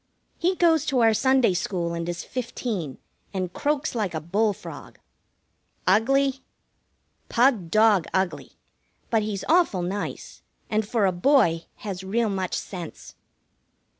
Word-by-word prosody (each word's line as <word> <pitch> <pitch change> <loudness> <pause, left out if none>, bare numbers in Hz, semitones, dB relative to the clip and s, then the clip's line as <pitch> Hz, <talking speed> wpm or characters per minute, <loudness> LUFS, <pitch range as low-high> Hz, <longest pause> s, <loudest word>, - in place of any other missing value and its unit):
He 360 +2 +1
goes 325 -4 +3
to 265 -4 +2
our 225 -1 +5
Sunday 260 -3 +3
school 175 -1 -2
and 170 0 -3
is 175 - -4
fifteen, 225 - -4 0.4
and 185 -2 -2
croaks 295 +1 -1
like 210 -8 -2
a - - -1
bull 200 +8 +1
frog. 195 - -10 0.9
Ugly? 270 +7 +3 0.9
Pug 235 -8 +2
dog 215 -3 +4
ugly; 190 -1 -2 0.6
but 225 -2 +3
he's 210 -2 -3
awful 320 - +3
nice, 195 +3 -5 0.3
and 215 -1 0
for 225 -2 +1
a 190 - +3
boy 175 - +3
has 190 -3 -6
real 220 +4 0
much 190 -2 -2
sense. 175 -5 -7
210 Hz, 135 wpm, -25 LUFS, 180-255 Hz, 0.9 s, our